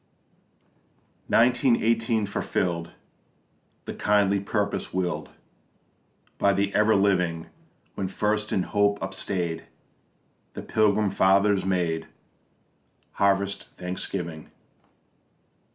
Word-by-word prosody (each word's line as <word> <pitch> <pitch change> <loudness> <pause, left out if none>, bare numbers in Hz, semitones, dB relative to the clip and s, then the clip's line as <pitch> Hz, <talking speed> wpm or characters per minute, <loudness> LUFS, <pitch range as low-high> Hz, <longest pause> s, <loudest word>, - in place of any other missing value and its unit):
Nineteen 125 +1 +4
eighteen 115 -1 +1
fulfill'd 90 -4 -2 0.9
The - - -5
kindly 100 -1 +2
purpose 100 +1 -2
will'd 90 -1 -2 1.1
By 100 - +3
the 100 +1 0
Ever 105 +1 +4
living, 90 -5 +1 0.4
When 95 - -3
first 105 +2 -1
in 95 - +1
hope 100 0 +1
upstay'd 85 -4 -3 0.9
The - - -6
Pilgrim 105 -2 +2
Fathers 100 0 +3
made 85 -4 -1 1.0
Harvest 100 0 0
thanksgiving. 90 -3 -5
100 Hz, 85 wpm, -25 LUFS, 90-105 Hz, 1.1 s, Nineteen